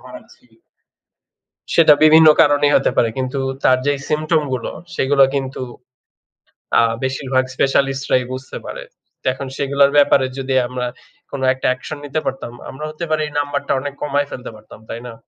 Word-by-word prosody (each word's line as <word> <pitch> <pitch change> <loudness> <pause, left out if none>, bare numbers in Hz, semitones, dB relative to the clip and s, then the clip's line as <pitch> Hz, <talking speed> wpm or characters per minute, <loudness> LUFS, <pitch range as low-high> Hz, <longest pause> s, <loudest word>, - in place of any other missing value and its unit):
হারাচ্ছি। - - -14 1.3
সেটা 160 -3 +7
বিভিন্ন 160 +1 +7
কারণেই 145 0 +3
হতে 135 - 0
পারে। 115 - +3
কিন্তু 130 +1 -2 0.2
তার 130 - +5
যেই 145 -1 +1
symptom 155 +1 +1
গুলো, 125 -3 -3 0.2
সেগুলা 135 0 +4
কিন্তু 135 -1 -3 1.2
আ - - +4 0.2
বেশিরভাগ 130 0 0
স্পেশালিস্টরাই 135 -1 +1
বুঝতে 130 +1 -7
পারে। - - -7 0.4
তো - - -34
এখন 135 +1 -7
সেগুলোর 140 0 +2
ব্যাপারে 140 -2 +5
যদি 135 0 -2
আমরা 125 0 -4 0.4
কোন 140 - -5
একটা 130 - -3
অ্যাকশন 130 +4 -6
নিতে 145 +2 -2
পারতাম, 130 -3 -4 0.2
আমরা 150 +3 -7
হতে 155 +3 -5
পারে 155 0 +1
এই 150 - -11
নাম্বারটা 145 0 -2
অনেক 145 0 -5
কমায় 145 -1 0
ফেলতে 125 - -7
পারতাম, 110 0 -15
তাই 115 - -6
না? 120 - -8
140 Hz, 155 wpm, -19 LUFS, 130-145 Hz, 1.3 s, সেটা